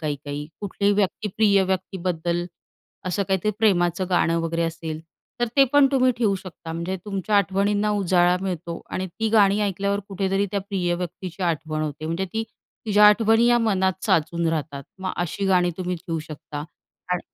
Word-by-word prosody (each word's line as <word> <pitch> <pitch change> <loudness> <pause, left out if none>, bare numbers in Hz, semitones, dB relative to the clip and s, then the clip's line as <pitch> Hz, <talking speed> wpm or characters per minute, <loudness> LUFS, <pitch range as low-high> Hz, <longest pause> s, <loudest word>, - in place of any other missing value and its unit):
काही-काही, 145 -1 -4
कुठल्याही 200 0 0
व्यक्ती, 210 +1 0
प्रिय 200 -3 +4
व्यक्तीबद्दल 180 -2 -2 0.6
असं 185 +2 0
काहीतरी 190 +2 +1
प्रेमाचं 180 -4 +2
गाणं 170 -1 +2
वगैरे 165 0 -1
असेल, 165 -1 -4 0.4
तर 240 - +3
ते 275 - +8
पण 285 -1 +7
तुम्ही 255 -1 +4
ठेवू 215 -5 +2
शकता. 180 -3 -8
म्हणजे 170 +3 -3
तुमच्या 205 0 -1
आठवणींना 200 +2 +2
उजाळा 180 -3 +3
मिळतो 175 -3 -4
आणि 185 - -2
ती 220 +5 -3
गाणी 205 -1 +4
ऐकल्यावर 200 0 -1
कुठेतरी 195 +1 0
त्या 200 -1 -1
प्रिय 185 -3 -1
व्यक्तीची 180 +1 -6
आठवण 155 -2 -1
होते, 150 0 -4
म्हणजे 165 +4 -1
ती 225 - -1 0.4
तिच्या 210 0 +6
आठवणी 225 +2 +4
या 240 0 +5
मनात 190 -4 0
साचून 170 -3 +1
राहतात. 150 -3 -3
मग 190 0 -3
अशी 175 +3 -2
गाणी 180 -2 +3
तुम्ही 180 0 -2
ठेवू 165 -1 -4
शकता 150 -1 -7 0.5
आणि 180 - 0
185 Hz, 165 wpm, -24 LUFS, 170-200 Hz, 0.6 s, ते